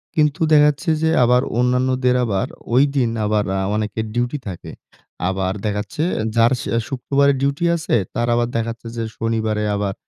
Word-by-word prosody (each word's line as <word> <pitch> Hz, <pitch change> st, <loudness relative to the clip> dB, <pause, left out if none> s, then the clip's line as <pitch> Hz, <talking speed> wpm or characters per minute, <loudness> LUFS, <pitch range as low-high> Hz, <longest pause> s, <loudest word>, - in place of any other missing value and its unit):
কিন্তু 150 Hz, 0 st, +1 dB
দেখাচ্ছে 150 Hz, +3 st, +4 dB
যে 160 Hz, -, +2 dB
আবার 125 Hz, +1 st, +4 dB, 0.2 s
অন্যান্যদের 125 Hz, 0 st, +2 dB
আবার 110 Hz, +1 st, -1 dB, 0.3 s
ঐদিন 135 Hz, -2 st, +3 dB, 0.2 s
আবার 105 Hz, 0 st, +1 dB
আ -, -, 0 dB, 0.2 s
অনেকের 110 Hz, +1 st, -2 dB
ডিউটি 120 Hz, +4 st, -1 dB
থাকে। 90 Hz, -3 st, -7 dB, 0.6 s
আবার 95 Hz, 0 st, -1 dB
দেখাচ্ছে 105 Hz, +8 st, -2 dB, 0.3 s
যার 115 Hz, 0 st, +4 dB
শ -, -, -5 dB, 0.3 s
শুক্রবারে 140 Hz, +1 st, +2 dB
ডিউটি 140 Hz, +4 st, 0 dB
আছে 160 Hz, -6 st, -1 dB, 0.2 s
তার 120 Hz, +1 st, -1 dB
আবার 120 Hz, 0 st, +1 dB
দেখাচ্ছে 115 Hz, 0 st, -4 dB
যে 115 Hz, -, -2 dB
শনিবারে 110 Hz, -2 st, -1 dB
আবার 100 Hz, -1 st, -1 dB
120 Hz, 150 wpm, -20 LUFS, 110-140 Hz, 0.6 s, দেখাচ্ছে